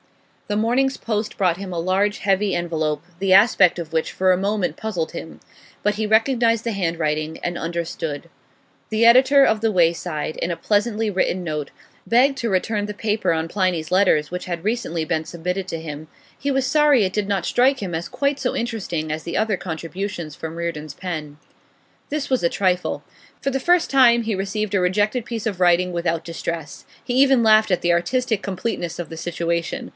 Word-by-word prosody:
The 205 - -1
morning's 250 +5 +1
post 215 -1 -3
brought 180 -4 +2
him 195 -1 -7
a 175 - -3
large 195 +4 +1
heavy 195 0 +1
envelope, 160 -3 -2 0.2
the 195 -1 0
aspect 195 -3 +5
of 165 -1 -7
which 160 -1 0
for 185 0 +2
a - - +1
moment 200 0 -1
puzzled 180 -7 -3
him. 160 - -8 0.4
But 210 0 +1
he 215 +1 -1
recognised 230 +1 +2
the 230 - -1
handwriting, 160 -4 -2
and 175 0 -3
understood. 165 -3 -4 0.6
The 220 +1 +2
editor 260 +4 +7
of 220 -1 +1
The 225 -1 +2
Wayside, 165 -3 0
in 175 - -2
a 170 - -3
pleasantly 210 +4 0
written 185 -1 0
note, 150 -3 -3 0.4
begged 270 +4 +3
to 235 - -1
return 205 +2 0
the 210 - -5
paper 210 -1 0
on 160 0 -1
Pliny's 175 -4 -1
Letters 180 -6 +3
which 180 0 -5
had 175 0 -5
recently 210 -8 -1
been 160 0 -1
submitted 180 +3 -4
to 165 - -4
him; 155 -1 -7 0.3
he 280 - -2
was 270 -1 +1
sorry 290 -5 +4
it 185 - -3
did 205 -1 -1
not 195 -3 0
strike 260 +2 +3
him 185 -6 -4
as 165 +1 -4
quite 280 0 0
so 255 -2 -1
interesting 195 -9 -3
as 155 +1 -3
the 170 - -3
other 215 -2 +1
contributions 170 -1 -5
from 160 0 -7
Reardon's 155 -4 -4
pen. 155 -5 -6 0.7
This 290 -1 -3
was 260 -6 +1
a 170 - +3
trifle. 180 -1 0 0.4
For 275 - -1
the 270 - -1
first 350 +5 +3
time 240 -3 +5
he 220 -2 -1
received 200 +2 -3
a 195 - +2
rejected 210 +6 +1
piece 230 -2 -5
of 195 -5 -3
writing 180 0 +3
without 170 -1 -1
distress; 165 -2 -5 0.2
he 245 - -4
even 265 -1 +5
laughed 215 -1 +5
at 180 - +1
the 175 0 +2
artistic 220 +5 0
completeness 180 -3 -4
of 175 - -4
the 165 - -8
situation. 170 +9 -3
190 Hz, 190 wpm, -22 LUFS, 170-225 Hz, 0.7 s, editor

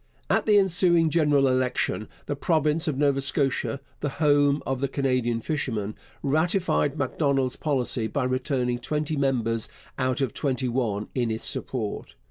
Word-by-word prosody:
At - - +2
the 210 -1 +6
ensuing 175 -4 +3
general 145 -4 +3
election 130 -4 0 0.2
the 145 - -2
province 155 +2 +1
of 145 -4 -1
Nova 140 -1 +2
Scotia 140 0 0 0.2
the 145 - -1
home 145 -1 +3
of 135 0 -2
Canadian 125 -4 0
fishermen 115 -8 -2 0.3
ratified 160 0 +1
Macdonald's 135 -2 0
policy 130 -5 0
by 140 +4 -2
returning 130 -1 -1
twenty 150 +4 -2
members 120 -5 0 0.3
out 130 -1 0
of 135 -6 -1
twenty 130 -2 -1
one 115 -4 -1
in 120 -3 0
its 110 0 -2
support. 110 -6 -3
135 Hz, 140 wpm, -26 LUFS, 125-150 Hz, 0.3 s, the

